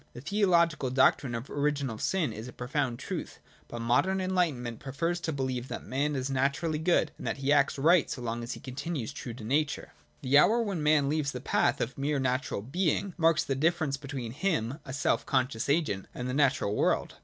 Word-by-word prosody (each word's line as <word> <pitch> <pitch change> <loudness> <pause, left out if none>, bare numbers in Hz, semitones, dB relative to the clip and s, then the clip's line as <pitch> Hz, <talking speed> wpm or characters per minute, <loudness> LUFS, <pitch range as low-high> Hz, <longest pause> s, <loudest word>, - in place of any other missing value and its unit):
The 120 - -9
theological 170 -5 +2
doctrine 130 -1 +3
of 115 +3 -5
original 140 -5 -1
sin 165 - 0
is 110 +3 -7
a - - -8
profound 125 -1 -2
truth; - - -5 0.2
| - - -29
but 120 -1 -6
modern 185 +12 +2
enlightenment 165 -11 -1
prefers 165 +6 -2
to 165 - -2
believe 130 -3 -2
that - - -6
man 145 +3 -1
is 130 -1 -1
'■■ - - -2
naturally 140 +4 0
good, 160 -1 +2
and - - -6
that - - -1
he 140 +1 +2
acts 140 -1 +3
right 165 +3 +4
so - - -4
long 120 -1 -3
as 120 - -4
he - - -9
continues, 135 -1 -4
true 120 -3 -7
to 120 - -10
nature. 145 +6 -1 0.3
The 135 +3 +5
hour 225 +9 +5
when 195 -7 -2
man 150 -2 +3
leaves 145 -1 0
the 125 - -4
path - - +1
of 125 +3 -3
mere 145 +1 0
natural 130 -5 -1
being 175 - 0
marks 165 -2 +3
the 135 - -2
diflerence 155 -1 0
between 135 -5 -5
him, 140 - -1
a - - -7
self 140 +2 +1
conscious 130 -2 0
agent, 140 - 0
and 125 - -4
the 125 - -2
natural 135 -7 +2
world. - - 0
140 Hz, 210 wpm, -29 LUFS, 125-160 Hz, 0.3 s, The